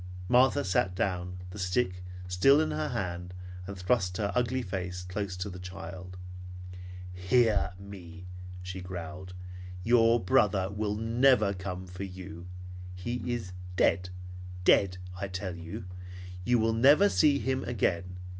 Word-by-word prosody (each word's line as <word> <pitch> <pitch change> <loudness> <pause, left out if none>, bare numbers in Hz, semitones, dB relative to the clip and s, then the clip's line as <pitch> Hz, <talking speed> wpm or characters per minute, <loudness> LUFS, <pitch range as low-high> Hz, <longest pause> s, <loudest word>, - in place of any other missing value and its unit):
Martha 125 -2 +5
sat 90 0 +2
down, 90 -1 -1
the 105 - -8
stick 90 0 0 0.2
still 95 +11 +6
in 155 - +1
her 75 0 -1
hand, 90 -1 -3 0.3
and 100 -1 -6
thrust 90 -1 +1
her 100 -2 0
ugly 125 +1 +1
face 90 -2 -3
close 90 0 -3
to 90 - -3
the 90 -2 -7
child's. 90 0 -7 1.0
"Hear 95 0 +3
me!" 90 -3 -10 0.4
she 90 +1 -5
growled. 90 0 -6 0.5
"Your 115 +1 +5
brother 100 -3 +3
will 105 0 -1
never 115 -1 +4
come 95 -1 -5
for 90 +1 -9
you. 90 -2 -8 0.5
He 120 +7 -3
is 110 -7 -3 0.2
dead. 90 0 +3 0.5
Dead, 90 -1 +5 0.2
I 100 - -2
tell 95 -1 -4
you! 85 +1 -6 0.6
You 120 +5 +4
will 115 0 +3
never 140 - +7
see 150 -7 +4
him 130 -1 0
again. 90 -6 0
95 Hz, 135 wpm, -30 LUFS, 90-115 Hz, 1.0 s, never